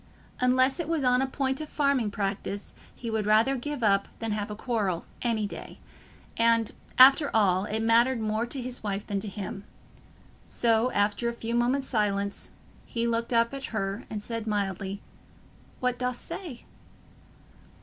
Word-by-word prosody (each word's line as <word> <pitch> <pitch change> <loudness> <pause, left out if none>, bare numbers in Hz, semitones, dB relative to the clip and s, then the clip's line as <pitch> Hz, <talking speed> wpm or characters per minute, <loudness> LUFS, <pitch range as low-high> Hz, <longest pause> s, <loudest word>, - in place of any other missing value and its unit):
Unless 255 +4 +3
it 335 - -2
was 325 -4 0
on 250 0 +4
a 270 - +1
point 265 +1 -1
of 305 - -6
farming 280 -6 +1
practice, 200 0 -4 0.2
he 230 -2 -5
would 215 -2 -1
rather 220 +6 +4
give 275 0 -4
up 200 -2 +3
than 225 -1 -3
have 210 0 -2
a 210 - -5
quarrel, 210 -7 -1 0.2
any 225 -3 0
day; 200 - -8 0.6
and, 230 -1 +3 0.3
after 270 +3 +8
all, 190 -3 +3
it 220 +1 -1
mattered 235 +2 +4
more 220 +2 -1
to 270 - -2
his 250 0 -4
wife 200 -1 -3
than 200 -1 -2
to 210 - -6
him. 195 0 -6 0.8
So, 230 +1 +2
after 205 +3 +1
a - - -4
few 230 0 -4
moments' 250 +3 +1
silence, 200 -3 -1 0.3
he 235 0 -2
looked 230 0 -1
up 230 +1 +3
at 275 0 -5
her 200 +1 -3
and 210 -2 -5
said 230 -1 -4
mildly, 200 -1 -2 0.8
"What 250 -1 0
dost 250 -1 -1
say?" 315 -11 -7
230 Hz, 165 wpm, -27 LUFS, 205-250 Hz, 0.8 s, after